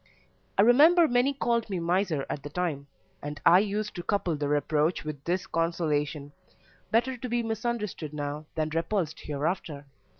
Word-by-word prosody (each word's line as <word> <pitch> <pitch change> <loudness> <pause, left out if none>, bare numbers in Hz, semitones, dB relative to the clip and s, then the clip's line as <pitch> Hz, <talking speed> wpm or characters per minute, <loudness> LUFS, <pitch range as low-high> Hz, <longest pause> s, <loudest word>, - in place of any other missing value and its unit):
I 200 - +6
remember 315 +9 +6
many 245 +1 +2
called 235 -4 0
me 190 - -2
miser 170 -3 0
at 140 - -4
the 145 - -7
time, 150 -4 -3 0.3
and 145 0 -6
I 175 +2 +8
used 210 +1 -2
to 175 - -5
couple 180 -3 0
the 145 -1 -2
reproach 150 +3 +1
with 150 -2 -6
this 180 +2 -1
consolation 155 -3 -1 0.6
better 240 +4 +1
to 250 +1 -6
be 240 0 0
misunderstood 220 -8 -3
now 150 0 -5
than 155 -1 -1
repulsed 165 +1 -1
hereafter. 150 0 -3
170 Hz, 160 wpm, -28 LUFS, 150-220 Hz, 0.6 s, I